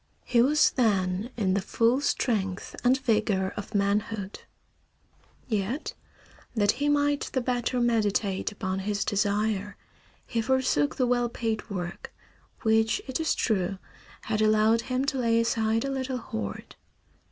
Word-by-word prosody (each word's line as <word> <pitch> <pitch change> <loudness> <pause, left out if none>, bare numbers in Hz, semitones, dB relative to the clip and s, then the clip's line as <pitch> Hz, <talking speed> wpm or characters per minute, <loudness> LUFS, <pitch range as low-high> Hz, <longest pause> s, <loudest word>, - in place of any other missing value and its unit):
He 235 - +3
was 295 +5 +4
then 200 -3 +1
in 195 -5 +1
the 195 - +1
full 230 +6 +2
strength 195 -9 -1
and 250 +2 +4
vigor 210 -6 +1
of 205 +1 -7
manhood. 200 0 -1 1.1
Yet, 220 - -2 0.6
that 205 -2 +4
he 285 +4 -1
might 290 0 +1
the 260 - +2
better 245 0 -1
meditate 215 -4 +1
upon 190 -2 -3
his 205 +1 -1
desire 205 0 0 0.5
he 230 - -1
forsook 255 - +1
the 255 - +1
well 245 -1 +1
paid 225 -2 -3
work, 175 -3 -5 0.5
which, 220 -1 +3
it 260 +1 -3
is 320 - +1
true, 195 -4 0 0.4
had 215 0 -1
allowed 215 +1 +4
him 255 +2 -1
to 280 -2 -1
lay 230 -2 +3
aside 225 0 +1
a 275 - -2
little 260 -1 -2
hoard. 110 - -6
220 Hz, 140 wpm, -27 LUFS, 200-245 Hz, 1.1 s, was